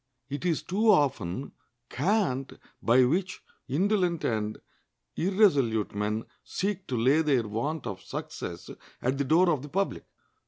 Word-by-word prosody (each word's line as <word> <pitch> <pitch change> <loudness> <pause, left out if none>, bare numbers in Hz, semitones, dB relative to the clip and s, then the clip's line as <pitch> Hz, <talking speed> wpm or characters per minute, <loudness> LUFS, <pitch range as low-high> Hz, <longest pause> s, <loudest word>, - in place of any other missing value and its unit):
It 145 +5 -4
is 165 -3 0
too 215 +5 +1
often 135 - +2 0.4
cant 145 - 0 0.3
by 125 +2 +5
which 185 +7 -1 0.2
indolent 180 +3 +1
and 110 -2 -1 0.6
irresolute 145 - +2
men 105 +2 -2 0.2
seek 195 -1 -3
to 125 - -2
lay 135 +7 +4
their 135 -8 +2
want 140 +8 -3
of 100 -5 -5
success 85 0 -6 0.3
at 130 +3 -1
the - - +2
door 170 +6 +4
of 150 -5 0
the 145 - -9
public. 195 +6 -1
145 Hz, 135 wpm, -28 LUFS, 115-180 Hz, 0.6 s, by